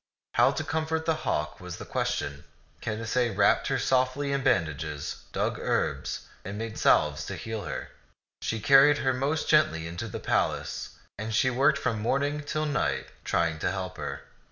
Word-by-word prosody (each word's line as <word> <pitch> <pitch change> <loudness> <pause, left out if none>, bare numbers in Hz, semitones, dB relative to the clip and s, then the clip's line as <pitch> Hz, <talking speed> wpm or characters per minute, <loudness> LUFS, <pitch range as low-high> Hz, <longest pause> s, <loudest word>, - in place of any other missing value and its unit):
How 120 +2 +5
to 155 - -2
comfort 160 0 -1
the 165 - +3 0.2
hawk 75 - -1
was 90 -1 -7
the - - -8
question. 70 0 -2 0.4
Canacee 115 0 -1
wrapped 100 - +4
her - - +1
softly 130 +2 +1
in 140 0 +1
bandages, 75 - -1
dug - - -1
herbs, - - -1 0.2
and 100 +2 -5
made 115 0 -5
salves - - +3
to - - -4
heal 110 -2 -5
her. - - -5 0.5
She 110 - -2
carried 140 +5 +7
her 130 -2 +1
most 140 +5 -1
gently 85 - +2
to 115 +6 -4
the 105 - -5
palace, - - -1 0.2
and 110 +1 -2
she 130 +3 +3
worked 140 +4 +3
from 110 -5 -1
morning 140 +5 0
till 155 +1 -1
night, 145 -4 -1
trying 80 -2 0
to - - 0
help 95 0 -4
her. - - -5
120 Hz, 170 wpm, -28 LUFS, 95-140 Hz, 0.5 s, carried